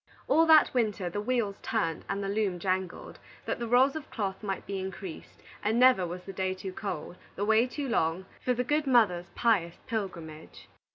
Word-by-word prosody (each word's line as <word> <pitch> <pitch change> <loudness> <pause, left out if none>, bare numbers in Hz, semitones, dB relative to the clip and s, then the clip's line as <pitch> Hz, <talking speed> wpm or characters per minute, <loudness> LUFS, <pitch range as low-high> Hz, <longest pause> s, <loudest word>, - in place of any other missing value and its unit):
All 325 0 +4
that 315 -2 +7
winter 210 -7 0
the 205 - -2
wheels 220 -3 -1
turned 165 -8 -1
and 200 0 -2
the - - -2
loom 200 -2 0
jangled, 185 0 -3 0.3
that - - -2
the 235 - -3
rolls 255 +4 +4
of 315 - -6
cloth 195 -4 -3
might 195 -3 -4
be 195 -1 -4
increased; 190 -2 -8 0.2
and 220 +3 +1
never 250 -8 +5
was 180 +1 -6
the 195 - -8
day 190 0 -1
too 190 0 -7
cold, 190 -3 -5 0.2
the 200 - -1
way 220 +3 +4
too 280 +2 -4
long, 175 -5 0 0.2
for 250 - +1
the 250 - 0
good 295 +3 0
mother's 200 -9 +3
pious 195 -8 +2
pilgrimage. 170 -9 -6
200 Hz, 190 wpm, -29 LUFS, 185-240 Hz, 0.3 s, that